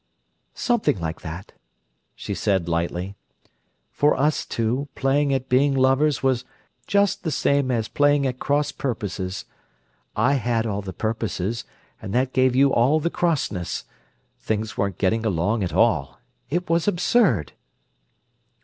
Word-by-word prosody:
"Something 240 Hz, -, +1 dB
like 80 Hz, 0 st, -4 dB
that," 85 Hz, +2 st, -7 dB, 0.6 s
she -, -, -5 dB
said 95 Hz, -4 st, 0 dB
lightly. 85 Hz, +3 st, -2 dB, 0.8 s
"For 145 Hz, -2 st, +2 dB
us 150 Hz, +2 st, +1 dB
two, 120 Hz, +5 st, -1 dB
playing 140 Hz, +1 st, +1 dB
at 130 Hz, -1 st, -1 dB
being 135 Hz, +2 st, +3 dB
lovers 135 Hz, +3 st, +2 dB
was 130 Hz, -2 st, +2 dB, 0.4 s
just 200 Hz, -1 st, +2 dB
the 160 Hz, -, -2 dB
same 140 Hz, -3 st, +1 dB
as 115 Hz, -3 st, 0 dB
playing 145 Hz, -1 st, +2 dB
at 130 Hz, -1 st, -2 dB
cross 145 Hz, +1 st, +1 dB
purposes. 95 Hz, -7 st, -4 dB, 0.7 s
I 120 Hz, +6 st, +3 dB
had 115 Hz, -2 st, +1 dB
all 100 Hz, -2 st, -2 dB
the 95 Hz, -1 st, -6 dB
purposes, 110 Hz, 0 st, -3 dB, 0.4 s
and 95 Hz, -, -5 dB
that 130 Hz, +1 st, +1 dB
gave 130 Hz, -1 st, +3 dB
you 135 Hz, +1 st, +4 dB
all 130 Hz, +7 st, +4 dB
the 170 Hz, +2 st, -1 dB
crossness: 135 Hz, -, -1 dB, 0.6 s
things 110 Hz, 0 st, -2 dB
weren't 100 Hz, -2 st, -1 dB
getting 110 Hz, +4 st, +1 dB
along 105 Hz, +2 st, 0 dB
at 90 Hz, -, -2 dB
all. 70 Hz, -, +2 dB, 0.3 s
It 175 Hz, +5 st, -1 dB
was 170 Hz, +2 st, +1 dB
absurd!" 175 Hz, -, +2 dB
125 Hz, 140 wpm, -23 LUFS, 100-145 Hz, 0.8 s, you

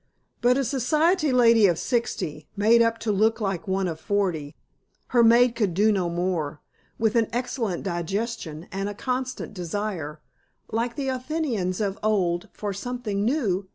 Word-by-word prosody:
But 245 Hz, +2 st, +4 dB
a 275 Hz, -, +1 dB
society 305 Hz, +5 st, +2 dB
lady 230 Hz, -4 st, +6 dB
of 175 Hz, -3 st, +1 dB
sixty, 170 Hz, -, -2 dB
made 225 Hz, +3 st, +5 dB
up 230 Hz, 0 st, +2 dB
to 220 Hz, -, 0 dB
look 220 Hz, +3 st, +2 dB
like 195 Hz, -5 st, -2 dB
one 190 Hz, 0 st, 0 dB
of 160 Hz, -2 st, -4 dB
forty 175 Hz, -7 st, -1 dB, 0.5 s
(her 240 Hz, -2 st, +4 dB
maid 235 Hz, +1 st, +6 dB
could 210 Hz, -7 st, 0 dB
do 210 Hz, +3 st, +4 dB
no 185 Hz, -4 st, 0 dB
more), 170 Hz, -4 st, -2 dB, 0.4 s
with 220 Hz, 0 st, +1 dB
an 230 Hz, -2 st, +3 dB
excellent 235 Hz, -6 st, -2 dB
digestion 175 Hz, -2 st, -3 dB
and 195 Hz, +1 st, -2 dB
a 205 Hz, -, -6 dB
constant 255 Hz, 0 st, -3 dB
desire, 175 Hz, -4 st, -4 dB, 0.5 s
like 235 Hz, +2 st, -1 dB
the 275 Hz, -2 st, -2 dB
Athenians 255 Hz, -, -2 dB
of 200 Hz, -1 st, -2 dB
old, 195 Hz, -2 st, 0 dB
for 205 Hz, -2 st, -4 dB
"Something 210 Hz, -1 st, -3 dB
New!" 210 Hz, -7 st, 0 dB
210 Hz, 155 wpm, -25 LUFS, 185-240 Hz, 0.5 s, lady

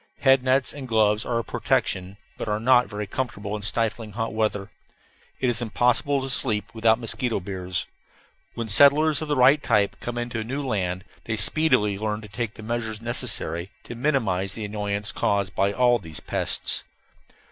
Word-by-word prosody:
Head 135 Hz, -1 st, +5 dB
nets 130 Hz, +1 st, +2 dB
and 140 Hz, -3 st, -7 dB
gloves 110 Hz, -1 st, +2 dB
are 120 Hz, -, -1 dB
a 115 Hz, -, -1 dB
protection, 95 Hz, -2 st, -1 dB, 0.2 s
but -, -, -6 dB
are 105 Hz, 0 st, -1 dB
not 125 Hz, +1 st, +4 dB
very 105 Hz, 0 st, -5 dB
comfortable 105 Hz, -2 st, -4 dB
in 105 Hz, -, -5 dB
stifling 110 Hz, 0 st, -1 dB
hot 115 Hz, 0 st, -3 dB
weather. 105 Hz, -3 st, -1 dB, 0.7 s
It 130 Hz, -, 0 dB
is 120 Hz, -1 st, +1 dB
impossible 120 Hz, +4 st, +1 dB
to 135 Hz, -, -4 dB
sleep 115 Hz, -4 st, 0 dB
without 110 Hz, 0 st, +3 dB
mosquito 120 Hz, 0 st, -2 dB
biers. 90 Hz, -1 st, -4 dB, 0.7 s
When 115 Hz, -1 st, -4 dB
settlers 145 Hz, +8 st, +5 dB
of 155 Hz, -, -4 dB
the 145 Hz, -, 0 dB
right 135 Hz, +3 st, +5 dB
type 105 Hz, -3 st, +1 dB
come 120 Hz, 0 st, -5 dB
into 120 Hz, -1 st, -3 dB
a -, -, -2 dB
new 135 Hz, +5 st, -4 dB
land 95 Hz, -6 st, -2 dB, 0.2 s
they 115 Hz, -1 st, -2 dB
speedily 105 Hz, -5 st, +2 dB
learn 105 Hz, 0 st, -2 dB
to 105 Hz, -, -10 dB
take 105 Hz, +2 st, -4 dB
the 110 Hz, -, -10 dB
measures 110 Hz, -1 st, -3 dB
necessary 110 Hz, -7 st, 0 dB
to -, -, -8 dB
minimize 115 Hz, -8 st, 0 dB
the 110 Hz, 0 st, -4 dB
annoyance 105 Hz, 0 st, -3 dB
caused 100 Hz, -1 st, 0 dB
by 100 Hz, +1 st, +1 dB
all 120 Hz, +2 st, +3 dB
these 80 Hz, -5 st, -5 dB
pests. -, -, 0 dB
110 Hz, 180 wpm, -24 LUFS, 105-125 Hz, 0.7 s, Head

